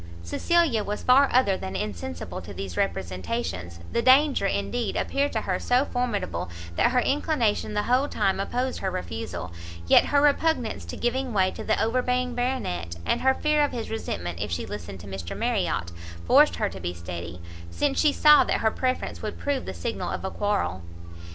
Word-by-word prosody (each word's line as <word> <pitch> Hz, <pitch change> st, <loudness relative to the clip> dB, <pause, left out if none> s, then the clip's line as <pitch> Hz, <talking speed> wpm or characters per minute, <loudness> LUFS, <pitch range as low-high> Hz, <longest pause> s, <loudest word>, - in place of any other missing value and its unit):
Cecilia 275 Hz, -, +2 dB
was 205 Hz, +1 st, -4 dB
far 270 Hz, +2 st, +6 dB
other 240 Hz, -6 st, +4 dB
than 95 Hz, -, -6 dB
insensible 85 Hz, -3 st, -5 dB
to 100 Hz, -, -10 dB
these 95 Hz, -2 st, -5 dB
representations; 90 Hz, -, -3 dB
the 235 Hz, -, +1 dB
danger, 265 Hz, -3 st, +5 dB
indeed, 230 Hz, +4 st, -2 dB
appeared 280 Hz, +1 st, 0 dB
to 220 Hz, -, 0 dB
her 185 Hz, -3 st, -1 dB
so 250 Hz, +3 st, +2 dB
formidable, 235 Hz, -, -2 dB, 0.3 s
that -, -, +3 dB
her 250 Hz, 0 st, +2 dB
inclination 260 Hz, -7 st, 0 dB
the 210 Hz, -, +1 dB
whole 255 Hz, +4 st, +2 dB
time 195 Hz, -8 st, 0 dB
opposed 250 Hz, +6 st, -2 dB
her 190 Hz, -, -1 dB
refusal; 85 Hz, -, -5 dB, 0.3 s
yet -, -, +6 dB
her 285 Hz, -, +3 dB
repugnance 290 Hz, -4 st, +1 dB
to -, -, -7 dB
giving 250 Hz, +1 st, -1 dB
way 190 Hz, -2 st, +3 dB
to -, -, -7 dB
the 220 Hz, -, +1 dB
overbearing 250 Hz, +2 st, 0 dB
Baronet, 240 Hz, -, -2 dB
and -, -, +1 dB
her 265 Hz, 0 st, +4 dB
fear 300 Hz, -1 st, +2 dB
of 290 Hz, -, 0 dB
his 230 Hz, -3 st, -4 dB
resentment 85 Hz, -, -4 dB
if -, -, -2 dB
she 85 Hz, -, -2 dB
listened 100 Hz, -1 st, -7 dB
to 95 Hz, -, -11 dB
Mr 95 Hz, -3 st, -6 dB
Marriot, 85 Hz, 0 st, -1 dB, 0.3 s
forced -, -, +5 dB
her -, -, 0 dB
to -, -, -8 dB
be 85 Hz, +1 st, -4 dB
steady, 85 Hz, 0 st, -7 dB, 0.3 s
since 285 Hz, -, 0 dB
she 300 Hz, -, +4 dB
saw 300 Hz, +1 st, +7 dB
that -, -, -1 dB
her 220 Hz, -, +3 dB
preference 255 Hz, +2 st, -2 dB
would 215 Hz, -1 st, -5 dB
prove 285 Hz, -2 st, -2 dB
the -, -, -4 dB
signal 235 Hz, -, -3 dB
of -, -, -4 dB
a 190 Hz, -, -3 dB
quarrel. 200 Hz, -, -1 dB
215 Hz, 185 wpm, -26 LUFS, -, 0.3 s, saw